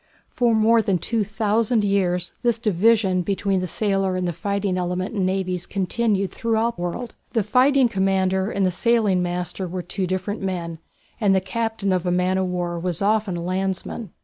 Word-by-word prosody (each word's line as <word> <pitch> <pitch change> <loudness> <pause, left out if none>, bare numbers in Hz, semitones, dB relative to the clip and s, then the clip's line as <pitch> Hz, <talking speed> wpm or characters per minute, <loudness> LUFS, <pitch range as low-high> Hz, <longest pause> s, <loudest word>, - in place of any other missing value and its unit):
For 235 -2 +2
more 225 +1 +4
than 195 -3 +1
two 220 +5 0
thousand 220 +2 +1
years 180 -3 0
this 235 -2 +2
division 210 -3 +2
between 195 +1 0
the 185 - -2
sailor 195 0 0
and 185 -1 -1
the 175 - -2
fighting 200 +1 -1
element 180 +2 -2
in 190 -3 +1
navies 185 -2 -2
continued 195 +1 0
throughout 230 0 0
the - - -6
world. 175 +8 -4 0.2
The 225 - +2
fighting 255 +5 +4
commander 190 -1 +1
and 200 -3 0
the 185 - +2
sailing 210 -1 +2
master 180 +1 -2
were 180 +1 -5
two 185 +1 -3
different 185 +3 -3
men, 170 -4 -3 0.4
and 200 -4 +3
the - - +4
captain 220 0 -2
of 180 -1 -1
a - - +2
man 180 +1 +1
of 190 - 0
war 175 -1 -2
was 180 +1 -2
often 210 -3 +1
a 170 - -4
landsman. 190 +3 -3
195 Hz, 185 wpm, -23 LUFS, 180-220 Hz, 0.4 s, more